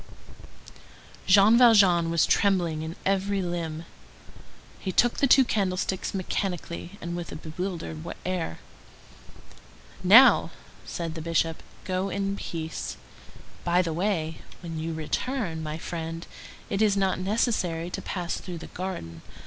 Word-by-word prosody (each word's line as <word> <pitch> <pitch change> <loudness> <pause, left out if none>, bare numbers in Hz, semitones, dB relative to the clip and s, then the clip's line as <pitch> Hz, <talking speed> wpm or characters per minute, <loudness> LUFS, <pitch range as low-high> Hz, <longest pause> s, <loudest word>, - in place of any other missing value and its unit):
Jean 205 +5 +7
Valjean 195 -8 +6
was 165 -1 +3
trembling 175 -6 +2
in 160 +1 -5
every 195 +1 +1
limb. 170 -3 -3 0.9
He 190 - -3
took 240 +5 +3
the 275 - +3
two 265 +1 +7
candlesticks 190 -3 -1
mechanically, 180 -1 -3
and 170 0 -5
with 175 -1 -5
a - - -6
bewildered 160 - -5 0.3
air. 180 - -2 1.5
"Now," 225 +9 +7 0.4
said 165 -2 -4
the 160 - -6
Bishop, 165 0 0 0.2
"go 185 +1 -1
in 195 +1 -2
peace. 160 -4 -5 0.7
By 175 +1 +3
the 165 -2 -2
way, 165 -3 -1 0.2
when 165 -2 -5
you 160 0 -3
return, 165 - -2
my 155 0 -4
friend, 165 0 -5 0.4
it 195 - -2
is 205 -2 +3
not 190 -1 +1
necessary 185 -4 0
to - - -4
pass 175 -3 -3
through 180 -2 -7
the 165 - -9
garden. 85 - -5
180 Hz, 130 wpm, -26 LUFS, 165-195 Hz, 1.5 s, Jean